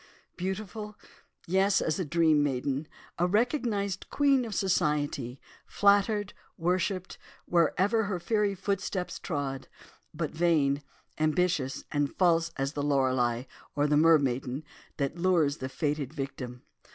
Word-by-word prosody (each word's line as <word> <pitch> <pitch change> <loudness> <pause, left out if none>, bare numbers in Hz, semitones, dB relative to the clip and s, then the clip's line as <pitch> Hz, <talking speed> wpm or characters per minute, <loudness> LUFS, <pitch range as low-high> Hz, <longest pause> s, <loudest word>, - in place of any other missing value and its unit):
Beautiful, 210 +3 -5 0.5
yes, 195 +3 +3
as 160 - -1
a - - +1
dream 160 -1 +3
maiden! 140 +1 -1 0.3
a 175 - +3
recognised 210 - 0
queen 275 -3 +3
of 220 -4 -5
society, 145 -8 0 0.3
flattered, 205 0 +3 0.2
worshipped, 185 +2 -1 0.3
wherever 190 +6 +2
her 195 -3 -2
fairy 210 +1 +1
footsteps 195 -1 -2
trod; 140 -4 -3 0.4
but 155 -1 -3
vain, 155 -4 +2 0.4
ambitious 155 -3 +1
and 145 -2 -1
false 170 -2 +3
as 135 +1 -1
the 145 - -2
Lorelei, 130 -4 +1 0.3
or 145 - +2
the 150 0 +2
mermaiden, 140 -3 +3 0.3
that 140 +4 -2
lures 170 -5 +2
the 130 - -5
fated 145 -2 -2
victim. 135 -4 -6
165 Hz, 120 wpm, -29 LUFS, 140-195 Hz, 0.5 s, yes